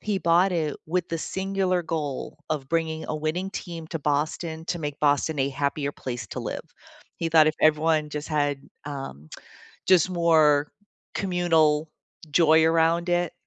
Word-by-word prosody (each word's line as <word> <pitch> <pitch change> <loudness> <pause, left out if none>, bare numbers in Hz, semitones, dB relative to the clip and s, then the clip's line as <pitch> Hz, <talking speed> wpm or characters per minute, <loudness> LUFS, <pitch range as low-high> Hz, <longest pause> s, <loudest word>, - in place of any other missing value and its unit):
he 205 -2 -1
bought 175 +3 +3
it 155 -4 -1
with 175 +2 -1
the 165 - -2
singular 190 0 -1
goal 150 -4 -4
of 140 -4 -2
bringing 160 -1 -1
a 155 - -2
winning 160 +5 -2
team 170 -4 -7
to 165 - -3
Boston 160 +3 -2
to 175 - -2
make 145 -2 -5
Boston 145 +1 +2
a 135 - +2
happier 140 +1 -2
place 120 -3 -5
to - - -5
live. - - -4 0.6
He 165 - -2
thought 160 -1 +6
if 155 - -1
everyone 155 0 +3
just 150 +1 -5
had, 145 -2 0 0.2
um, 135 - -7 0.6
just 185 -3 +5
more 155 -4 +3 0.4
communal 160 -5 +2 0.4
joy 160 0 +5
around 165 +2 +2
it 175 -1 +1
160 Hz, 155 wpm, -25 LUFS, 150-170 Hz, 0.6 s, thought